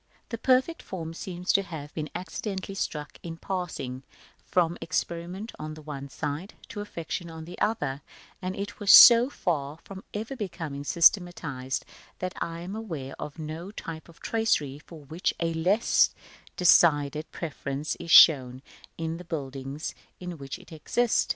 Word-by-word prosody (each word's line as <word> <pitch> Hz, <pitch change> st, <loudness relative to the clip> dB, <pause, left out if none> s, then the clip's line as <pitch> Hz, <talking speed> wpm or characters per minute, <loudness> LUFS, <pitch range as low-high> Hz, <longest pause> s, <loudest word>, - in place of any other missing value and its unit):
The 230 Hz, -, -3 dB
perfect 260 Hz, +7 st, +2 dB
form 165 Hz, -3 st, -6 dB
seems 180 Hz, +1 st, -2 dB
to 200 Hz, -, +5 dB
have 155 Hz, -6 st, -8 dB
been 155 Hz, -1 st, -4 dB
accidentally 190 Hz, +1 st, -4 dB
struck 150 Hz, -6 st, -4 dB
in 165 Hz, -1 st, -7 dB
passing 165 Hz, -10 st, -4 dB, 0.4 s
from 170 Hz, -2 st, +1 dB
experiment 175 Hz, +6 st, -3 dB
on 155 Hz, 0 st, -5 dB
the 155 Hz, -, -11 dB
one 140 Hz, -2 st, -7 dB
side, 150 Hz, +7 st, -4 dB
to 205 Hz, -, -5 dB
affectation 170 Hz, -3 st, -5 dB
on 160 Hz, -1 st, -8 dB
the 175 Hz, -, -10 dB
other; 150 Hz, -11 st, 0 dB, 0.4 s
and 185 Hz, 0 st, -3 dB
it 200 Hz, +1 st, -5 dB
was 205 Hz, -2 st, +4 dB
so 240 Hz, +1 st, +10 dB
far 150 Hz, -, -2 dB
from 195 Hz, -1 st, -10 dB
ever 220 Hz, +6 st, -4 dB
becoming 165 Hz, -, -5 dB
systematised, 160 Hz, -6 st, +2 dB, 0.3 s
that 185 Hz, 0 st, -3 dB
I 165 Hz, 0 st, -3 dB
am 185 Hz, +4 st, -6 dB
aware 165 Hz, -12 st, -5 dB
of 150 Hz, -, -6 dB
no 160 Hz, +3 st, -6 dB
type 165 Hz, -6 st, -8 dB
of 170 Hz, -, -17 dB
tracery 150 Hz, -12 st, 0 dB
for 155 Hz, -1 st, -13 dB
which 160 Hz, +6 st, -2 dB
a 165 Hz, -1 st, 0 dB
less 185 Hz, +8 st, +3 dB, 0.5 s
decided 155 Hz, -3 st, +4 dB
preference 145 Hz, -2 st, -4 dB
is 170 Hz, -, -8 dB
shown 130 Hz, -5 st, +7 dB, 0.3 s
in 165 Hz, 0 st, -3 dB
the 180 Hz, -, -9 dB
buildings 140 Hz, -2 st, -5 dB, 0.3 s
in 180 Hz, -3 st, -7 dB
which 135 Hz, -1 st, -6 dB
it -, -, -17 dB
exists. 230 Hz, +9 st, +1 dB
165 Hz, 155 wpm, -27 LUFS, 150-190 Hz, 0.5 s, so